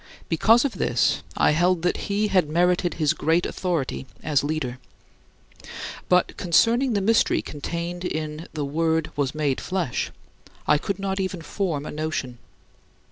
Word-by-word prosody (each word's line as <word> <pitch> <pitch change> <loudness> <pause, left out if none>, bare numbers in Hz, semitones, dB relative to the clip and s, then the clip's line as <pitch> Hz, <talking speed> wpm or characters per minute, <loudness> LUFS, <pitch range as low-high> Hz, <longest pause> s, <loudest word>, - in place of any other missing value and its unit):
Because 225 - +4
of 275 - -3
this, - - +2 0.2
I - - +4
held 175 +2 +2
that 180 - -1
he 205 +1 +1
had 180 -6 +2
merited 175 +2 +2
his 155 -1 +2
great 165 +2 +1
authority 165 -7 -2 0.2
as 150 -3 +2
leader. 145 -4 -2 1.3
But 180 0 +3
concerning 230 +9 +3
the 200 - +1
mystery 225 +3 +3
contained 170 +4 -5
in 155 -1 -4
"the 150 -2 -3
Word 160 +2 0
was 140 -1 -1
made 145 -4 0
flesh," 180 -9 -2 0.6
I 150 - +4
could 200 +3 -3
not 195 0 -2
even 185 -3 -3
form 165 -6 -2
a - - -5
notion. 150 -5 -3
170 Hz, 145 wpm, -24 LUFS, 150-185 Hz, 1.3 s, Because